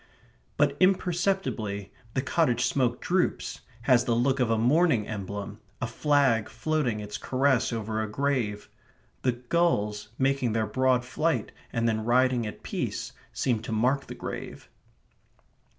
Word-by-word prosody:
But 145 -1 +2
imperceptibly 180 - 0 0.2
the 130 - +1
cottage 130 -4 +2
smoke 125 -2 +1
droops, 180 0 0 0.2
has 125 -1 +4
the 120 - +2
look 130 +3 +2
of 125 -3 +2
a 115 - +2
mourning 125 0 +3
emblem, 100 -1 -5 0.2
a - - -1
flag 135 -7 +2
floating 125 -2 -1
its 105 0 -6
caress 130 -1 +2
over 110 -1 -2
a 110 - -3
grave. 115 -4 -1 0.5
The 125 - +2
gulls, 120 -6 0
making 135 -3 +1
their 110 -1 +1
broad 125 +2 +2
flight 155 +6 0 0.2
and 115 -1 0
then 110 -1 0
riding 125 0 +3
at 105 - -9
peace, - - -3 0.2
seem 120 -4 0
to 115 - -6
mark 125 +6 +1
the - - -7
grave. - - -7
125 Hz, 140 wpm, -27 LUFS, 110-140 Hz, 0.5 s, has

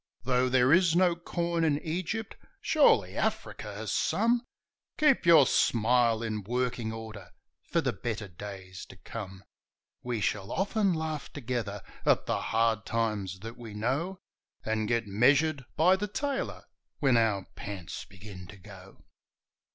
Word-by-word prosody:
Though 125 +1 +2
there 130 +2 +4
is 170 -2 +4
no 175 -1 +4
corn 170 -1 -2
in 150 -2 +2
Egypt, 185 +7 -3 0.2
surely 305 -3 +3
Africa - - -2
has - - -4
some 235 +1 +2 0.6
Keep 300 - +3
your 160 -5 +8
smile 115 -1 +3
in 110 -2 -2
working 120 +1 -2
order 110 -5 -8 0.4
for - - +2
the - - -1
better 110 -3 -4
days 95 0 -9
to - - -13
come! 95 0 -8 0.6
We 120 -2 -2
shall 100 -1 -1
often 200 +1 +1
laugh 160 -2 -4
together 115 -7 -4 0.2
at - - +3
the - - -1
hard 115 -1 +1
times 105 -5 -2
that 115 +2 -8
we 115 -3 -9
know, 140 - -1 0.5
And 110 -1 0
get 115 0 +1
measured 135 +7 +3
by 180 +4 +5
the 210 +2 -2
tailor 275 +6 -3 0.3
when 135 -4 +3
our 110 -4 +2
pants 100 -4 -6
begin 95 -1 -11
to 105 - -12
go. 95 -1 -14
120 Hz, 145 wpm, -29 LUFS, 105-160 Hz, 0.6 s, your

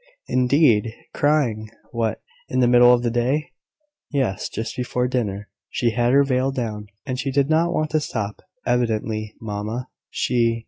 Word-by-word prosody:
"Indeed! 125 -4 +3 0.2
Crying! 125 -8 +1 0.2
What, 115 -3 -2 0.3
in 130 - 0
the 125 - +5
middle 120 0 +7
of 120 -1 +3
the 120 - +1
day?" 130 +6 0 0.6
"Yes; 130 -10 -1
just 115 - -4
before 125 0 -1
dinner. 105 -5 -2 0.2
She 120 -2 0
had 120 +1 +1
her 140 +1 +6
veil 130 -1 +1
down, 110 -5 -4 0.2
and 130 -2 -3
she 135 - -1
did 140 +2 +1
not 165 +2 +3
want 155 -2 -1
to 155 - +3
stop, 110 -8 -4 0.2
evidently, 110 -3 -1
mamma. 110 +3 -4 0.2
She 115 -2 +1
120 Hz, 155 wpm, -22 LUFS, 110-135 Hz, 0.6 s, middle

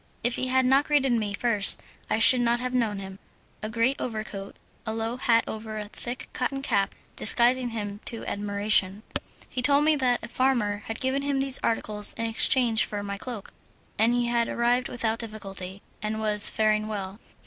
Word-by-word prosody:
If 240 +1 +1
he 255 - -2
had 260 0 +2
not 270 +3 +4
greeted 285 -3 +2
me 220 -3 0
first 210 -3 +1 0.3
I - - +1
should 250 +2 +7
not 240 0 +1
have 250 +1 -3
known 225 -5 0
him. 195 0 -9 0.4
A 215 - -4
great 230 +5 0
overcoat, 215 -4 -6 0.3
a 220 -1 -4
low 225 +2 -3
hat 230 -2 +3
over 220 0 -6
a 210 -1 -6
thick 240 +3 -6
cotton 270 +2 -3
cap, 200 -7 0 0.2
disguised 240 +3 +3
him 215 -5 -5
to 230 - -2
admiration. 205 0 0 0.4
He 255 - -4
told 285 +3 +4
me 310 0 +4
that 250 -3 +1
a - - -6
farmer 235 -4 0
had 225 - -5
given 265 +1 -1
him 280 -1 -1
these 270 -1 -2
articles 210 -2 +1
in 230 - -3
exchange 230 0 +2
for 205 -1 -5
my 200 0 -5
cloak, 230 -5 -7 0.4
that 220 +2 +4
he 245 0 +1
had 235 -1 0
arrived 240 +1 +1
without 230 -2 -2
difficulty, 195 -4 -7 0.2
and 215 +1 -3
was 210 -1 +8
faring 215 0 +1
well. 200 -1 -6
230 Hz, 185 wpm, -26 LUFS, 210-250 Hz, 0.4 s, was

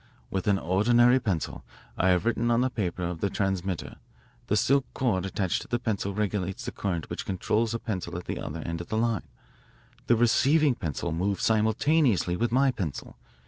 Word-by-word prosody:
"With 95 +1 -2
an 100 -1 +4
ordinary 120 +8 +4
pencil 95 -10 -3 0.3
I 95 - +2
have 90 +2 +2
written 120 0 +1
on 120 +1 +3
the 130 0 +1
paper 90 -6 -2
of 85 -1 -3
the 100 - +1
transmitter. 95 -2 -2 0.5
The 105 - +2
silk 135 +6 +3
cord 95 -8 0
attached 95 -2 -1
to - - -10
the 120 - 0
pencil 100 -4 -2
regulates 100 -3 -2
the - - -3
current 90 -5 -3
which - - -5
controls 110 +4 0
a - - -2
pencil 95 -6 -4
at 90 - -7
the - - -4
other 80 +2 -5
end 85 +1 -4
of 85 - -9
the 110 - -2
line. 115 -6 0 0.8
The 120 - +5
receiving 135 +6 +4
pencil 85 - -3
moves 95 +5 -1
simultaneously 110 - +2
with 115 +5 0
my 135 +2 +4
pencil. 90 - -5
100 Hz, 185 wpm, -27 LUFS, 90-120 Hz, 0.8 s, The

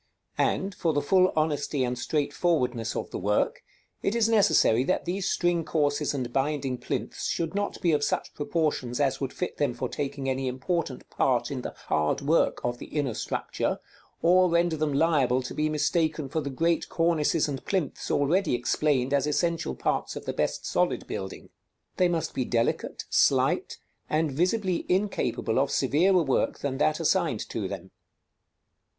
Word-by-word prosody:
And, 195 +1 +1
for 165 -3 0
the 145 - +1
full 185 +4 +4
honesty 145 -3 0
and 125 0 -1
straight 145 +3 -1
forwardness 125 -10 0
of - - -4
the - - -4
work, 105 +3 0 0.4
it 200 - 0
is 230 -2 +3
necessary 160 - +4
that 185 - 0
these 185 +2 -1
string 175 -1 +1
courses 145 -2 0
and 125 -3 -3
binding 135 -2 -1
plinths - - -3
should 165 0 -2
not 205 0 -2
be 170 - +4
of 145 -2 +2
such - - -1
proportions 145 -5 -1
as 135 -1 +1
would 135 -1 -2
fit 180 - -4
them 140 -5 0
for 130 +1 -2
taking 135 +1 -4
any 130 0 -1
important 135 +2 -2
part 120 -1 +1
in 130 -2 -3
the - - -6
hard 75 0 +1
work 150 +4 +2
of 120 0 -2
the - - -8
inner 145 -5 -1
structure, - - -2 0.5
or 180 +2 +5
render 170 -1 +2
them 155 -1 0
liable 140 -4 +2
to 125 - -6
be 155 0 0
mistaken 155 -1 0
for 160 +3 -1
the 140 - -4
great 165 +5 0
cornices 165 -2 +2
and 135 -3 -4
plinths 185 -8 -2
already 160 +2 +2
explained 130 +2 +1
as 140 +1 +2
essential 165 +2 0
parts - - -1
of - - -7
the - - -2
best - - -1
solid - - 0
building. 95 0 -6 0.5
They 180 - +4
must 165 -2 -1
be 130 - 0
delicate, 115 -1 -1
slight, - - +2 0.3
and 155 -1 +1
visibly 180 +4 0
incapable 180 - 0
of 135 0 +2
severer 170 +8 +3
work 135 -3 0
than 135 -1 -3
that 155 +1 +2
assigned 165 - +1
to - - -3
them. - - -7
150 Hz, 170 wpm, -27 LUFS, 130-170 Hz, 0.5 s, or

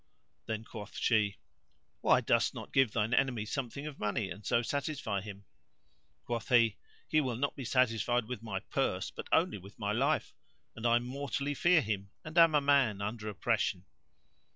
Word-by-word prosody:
Then 110 0 -3
quoth 110 -3 -9
she, 105 -3 +2 0.6
"Why - - +4
dost - - +2
not - - -8
give 135 -4 +4
thine 110 +2 0
enemy 125 -5 +1
something 135 +3 -4
of 150 -2 -7
money 105 -2 -1
and 100 +4 -8
so 120 - +2
satisfy 140 -6 -2
him?" 100 -1 -9 0.8
Quoth 120 0 -3
he, 115 -5 +4 0.3
"He 155 - +3
will 130 -4 -2
not 140 +4 -1
be 135 - -6
satisfied 120 -1 +2
with 125 -1 -6
my 100 -4 -4
purse - - -1
but - - -8
only 105 - +2
with 100 +2 -14
my 105 -2 -2
life, 140 +8 +1 0.4
and 115 +1 -1
I 120 0 +5
mortally 140 +3 -3
fear 175 +3 +4
him 100 -4 -3 0.2
and 155 +1 -8
am 165 -2 +6
a 145 - +4
man 140 -7 +3
under 105 +1 -4
oppression." 100 -3 -1
115 Hz, 175 wpm, -32 LUFS, 105-135 Hz, 0.8 s, am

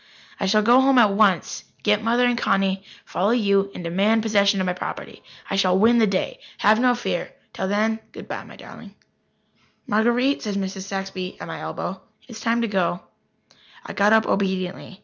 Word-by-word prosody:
"I 195 - -1
shall 215 +2 +3
go 240 +4 +5
home 270 0 +3
at 215 -5 +5
once, 200 -3 +1 0.2
get 210 0 +2
Mother 240 +2 +2
and 245 0 +2
Connie, 195 -4 0 0.2
follow 195 +3 -1
you, 200 -4 +2
and 180 - -7
demand 200 +6 +1
possession 200 -2 +2
of 185 - 0
my 180 - 0
property. 180 - -7 0.3
I - - -2
shall 185 -1 +3
win 235 +4 +4
the 220 - +4
day. 190 -1 -2 0.2
Have 215 +2 +3
no 250 0 +3
fear. 190 -7 -3 0.2
Till 190 - -3
then, 215 +3 0
good - - -11
bye, - - -6
my - - -14
darling." - - -13 0.9
"Marguerite," 240 +6 +1
said 210 -2 -4
Mrs. 190 -1 -4
Saxby 195 -1 -5
at - - -7
my - - -6
elbow, - - -5 0.2
"it - - -16
is 225 -1 -9
time 235 +1 +1
to - - 0
go." 185 -3 -1 0.8
I - - -7
got 205 +1 +3
up 220 0 +5
obediently. 190 0 -2
205 Hz, 190 wpm, -22 LUFS, 190-225 Hz, 0.9 s, go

